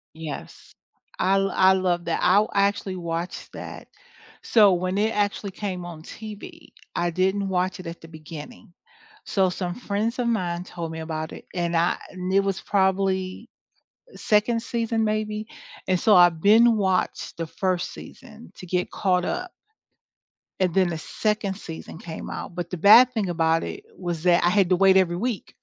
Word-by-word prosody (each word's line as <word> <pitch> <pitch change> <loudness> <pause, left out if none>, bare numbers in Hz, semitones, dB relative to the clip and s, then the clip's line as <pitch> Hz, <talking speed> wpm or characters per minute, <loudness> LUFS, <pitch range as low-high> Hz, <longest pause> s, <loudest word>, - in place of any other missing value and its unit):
Yes. 160 -3 -8 0.5
I 195 +1 +3
lo 195 0 0
I 190 0 +6
love 180 -2 0
that 165 - -1
I 200 +4 +4
actually 200 -1 +1
watched 170 0 -5
that. - - -9 0.5
So, 210 -4 +5
when 185 +2 -1
it 220 +2 +1
actually 205 -1 -1
came 185 -3 -5
on 165 -3 -9
TV, 220 - -10 0.3
I 175 - +1
didn't 190 +3 0
watch 185 0 -1
it 185 - -10
at 170 - -8
the 165 - -13
beginning, 155 +1 -11 0.5
so, 190 -2 +2
some 180 -1 -4
friends 225 +2 -2
of 235 - 0
mine 180 -6 -1
told 170 -3 -6
me 160 - -6
about 160 -1 -4
it - - -11
and 170 -1 -1
I 170 +2 +2
and 185 0 -5
it 195 - +5
was 195 -3 -2
probably, 190 +2 0 0.7
2nd 225 +2 +1
season, 230 -1 -1
maybe, 215 0 -2 0.4
and 185 -1 +2
so 215 - +5
I've 175 -2 +5
been 225 +2 +6
watched 190 -3 -1
the 165 - -2
1st 185 +1 -2
season 80 - -13
to 180 - -10
get 180 0 -1
caught 180 -3 +1
up 365 0 -3 1.1
and 185 -2 +2
then 185 0 +3
the 165 -2 -3
2nd 210 +3 -2
season 165 -3 -9
came 165 -2 -7
out, 175 - -6
but 175 -1 -5
the 180 - -3
bad 235 +8 +7
thing 210 -5 -1
about 165 -1 +1
it 400 +2 -7
was 175 -3 -4
that 175 -1 +4
I 175 - +4
had 195 -2 +3
to 180 - +5
wait 190 0 +5
every 175 -2 +3
week 225 +2 -3
185 Hz, 175 wpm, -24 LUFS, 175-205 Hz, 1.1 s, bad